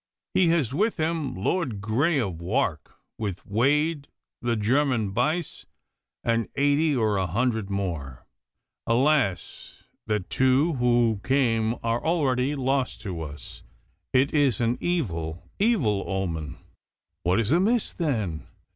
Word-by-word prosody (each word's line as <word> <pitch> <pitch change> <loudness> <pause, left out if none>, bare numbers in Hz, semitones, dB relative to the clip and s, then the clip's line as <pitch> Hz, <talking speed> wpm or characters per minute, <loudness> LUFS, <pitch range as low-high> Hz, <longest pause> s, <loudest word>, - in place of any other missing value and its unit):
He 185 - +4
has 160 -8 +1
with 210 +8 +1
him 160 -4 -1
Lord 120 - -1
Grey 135 - +1
of 95 -9 -3
Wark, 95 - -1 0.2
with 100 -4 -4
Wade, 145 +7 +1 0.3
the 120 -1 0
German 115 -1 +1
Buyse, 155 - -1 0.6
and 115 -1 0
eighty 145 +2 +2
or 110 -4 +1
a 95 -1 0
hundred 110 +2 0
more. 85 -10 -4 0.6
Alas! 125 -5 0 0.2
that 105 -4 -2
two 130 +6 +3
who 120 -4 +2
came 115 -4 +1
are 115 +1 0
already 140 -4 +1
lost 135 -3 -1
to 90 -6 -5
us. 75 -4 -8 0.5
It 130 +2 +2
is 140 -7 +2
an 120 +1 0
evil, 85 - -2 0.2
evil 140 - +2
omen.' 80 -7 -3 0.6
'What 90 +5 +2
is 115 +2 0
amiss, 205 +8 +2
then? 110 - -2
120 Hz, 125 wpm, -26 LUFS, 100-145 Hz, 0.6 s, He